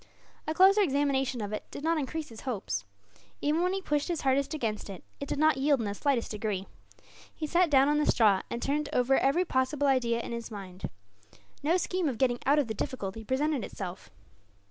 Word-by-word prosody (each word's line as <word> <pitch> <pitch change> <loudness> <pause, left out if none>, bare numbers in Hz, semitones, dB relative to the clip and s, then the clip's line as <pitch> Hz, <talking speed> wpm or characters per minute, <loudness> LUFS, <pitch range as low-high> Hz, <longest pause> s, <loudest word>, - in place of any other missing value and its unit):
A 310 - 0
closer 390 +4 +6
examination 270 - +1
of 205 0 -4
it 210 - -4
did - - -8
not 325 0 +2
increase 305 +2 -4
his 225 -1 -11
hopes. 190 - -3 0.5
Even 300 +3 +1
when 360 +1 +2
he 390 0 -3
pushed 295 -3 0
his 345 -3 -2
hardest 270 +1 +1
against 220 -8 -3
it, 190 -3 -8 0.2
it 280 - -6
did - - -1
not 310 -1 +4
yield 280 0 +3
in 225 - -2
the 200 - -2
slightest 260 +1 0
degree. 210 -3 -2 0.7
He 310 - -3
sat 345 +3 +3
down 275 -1 +5
on 295 +1 +2
the 300 - +1
straw, 205 -5 +4
and 235 - -4
turned 295 +1 0
over 255 +2 +3
every 310 +7 +2
possible 265 0 0
idea 245 -4 +2
in 235 - -5
his 235 -1 -5
mind. 195 -4 -7 0.7
No 320 +5 +2
scheme 365 -2 0
of 245 - -4
getting 245 -1 +1
out 285 +2 +5
of 295 - +3
the 220 - -2
difficulty 220 -1 -4
presented 270 +2 0
itself. 185 -2 -7
270 Hz, 210 wpm, -29 LUFS, 225-300 Hz, 0.7 s, closer